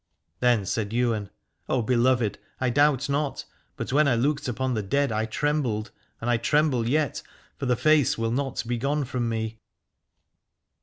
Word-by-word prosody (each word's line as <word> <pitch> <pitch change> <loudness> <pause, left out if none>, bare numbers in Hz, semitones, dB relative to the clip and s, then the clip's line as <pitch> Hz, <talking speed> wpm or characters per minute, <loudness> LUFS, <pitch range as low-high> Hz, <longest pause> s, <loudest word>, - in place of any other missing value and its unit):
Then 120 -5 +3
said 105 +2 -2
Ywain: 115 -4 0 0.4
O 125 -3 +1
beloved, 120 -2 +2 0.2
I 130 -1 +1
doubt 145 +1 +3
not: 145 0 -1 0.3
but - - -4
when 150 +1 +4
I 130 - +3
looked 140 +4 0
upon 125 +2 -1
the 110 - -1
dead 140 +8 0
I 110 +1 -1
trembled, 120 -4 -1 0.3
and 115 - -5
I 120 -1 +3
tremble 130 -1 +1
yet, 150 -1 0 0.4
for 135 - -2
the 125 - +3
face 155 +1 +3
will 115 0 -1
not 135 +1 -1
be 120 0 -2
gone 140 +3 0
from 120 -2 -2
me. 110 0 -3
125 Hz, 165 wpm, -26 LUFS, 115-140 Hz, 0.4 s, when